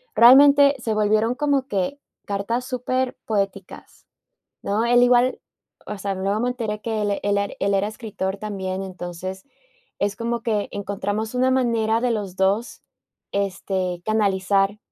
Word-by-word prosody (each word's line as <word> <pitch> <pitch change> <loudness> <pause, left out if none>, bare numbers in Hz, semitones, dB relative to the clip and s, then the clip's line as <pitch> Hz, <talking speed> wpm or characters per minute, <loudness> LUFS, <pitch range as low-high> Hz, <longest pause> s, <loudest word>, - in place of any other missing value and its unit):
realmente, 280 +3 +7
se 225 -2 -2
volvieron 215 +3 +2
como 285 -2 0
que, 200 +6 -2 0.3
cartas 205 +5 -2
superpoéticas, 245 -6 -3 0.6
¿no?, 210 +3 0
él 245 +1 +4
igual 245 +1 +3 0.5
O 210 - -5
sea, 195 0 -2
luego 195 +3 -1
me 245 +1 0
enteré 220 -4 -4
que 220 -2 -2
él 205 - 0
e - - -3
él 200 0 +2
e 200 0 -3
él 200 0 +1
era 200 +2 +1
escritor 210 -3 -4
también, 190 -2 -4
entonces, 185 0 -7 0.5
es 200 0 -1
como 235 0 -2
que 215 -4 -1
encontramos 205 +3 -3
una 255 +1 +2
manera 230 -3 +1
de 250 -1 0
los 200 -4 -4
2, 200 +5 0 0.5
este, 190 -2 -2
canalizar, 200 -1 +1
210 Hz, 145 wpm, -22 LUFS, 195-240 Hz, 0.6 s, realmente